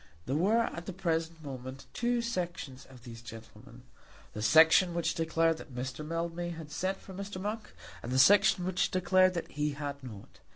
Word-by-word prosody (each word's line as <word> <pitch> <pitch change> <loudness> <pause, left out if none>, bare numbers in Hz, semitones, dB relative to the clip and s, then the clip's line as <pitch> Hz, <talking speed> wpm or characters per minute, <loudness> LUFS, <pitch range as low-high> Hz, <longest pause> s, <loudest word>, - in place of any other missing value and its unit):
There 135 - -1
were 205 +9 +3
at 170 -5 -5
the 190 - -4
present 165 -3 -2
moment 130 -1 -8
two 240 0 0
sections 175 - -4
of 125 -3 -15
these 115 -2 -10
gentlemen, 115 +1 -12 0.5
the 105 - -5
section 160 - +6
which 170 - 0
declared 165 0 +1
that 135 -6 -11
Mr. 130 +3 -4
Mildmay 165 +2 -3
had 160 -3 -8
sent 185 +5 -2
for 190 - -12
Mr. 195 0 -6
Monk, 210 +2 -4 0.3
and 120 - -6
the 130 - +1
section 195 +4 +5
which 185 0 +1
declared 185 0 +3
that 170 - -4
he 150 0 -1
had 140 -1 -6
not. 110 -6 -11
165 Hz, 180 wpm, -31 LUFS, 135-185 Hz, 0.5 s, section